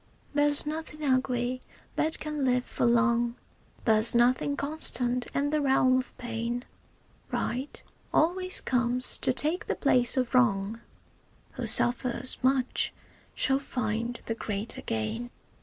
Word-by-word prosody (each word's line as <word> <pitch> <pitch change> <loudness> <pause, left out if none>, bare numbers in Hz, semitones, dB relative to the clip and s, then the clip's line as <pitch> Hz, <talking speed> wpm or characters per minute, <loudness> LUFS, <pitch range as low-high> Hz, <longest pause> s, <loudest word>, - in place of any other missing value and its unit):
There's 290 0 +2
nothing 305 0 -5
ugly 255 -1 0 0.3
that 315 - 0
can 300 -2 -4
live 250 -1 +1
for - - -1
long, 235 0 +2 0.5
There's 220 +1 +5
nothing 255 +4 +2
constant 250 -5 +3
in 285 +1 0
the 305 -1 +1
realm 260 -2 +3
of 255 - -8
pain; 235 +1 -4 0.7
Right 260 +4 -3 0.3
always 370 +3 +2
comes 250 0 0
to - - 0
take 305 +7 0
the - - -1
place 250 -3 +2
of 255 -1 -1
wrong, 220 -3 +1 0.7
Who - - -4
suffers 245 +1 +2
much 260 0 0 0.4
shall 270 0 +1
find 235 -3 -3
the 225 - -2
greater 215 -1 -4
gain. 115 - -3
250 Hz, 125 wpm, -28 LUFS, 235-280 Hz, 0.7 s, There's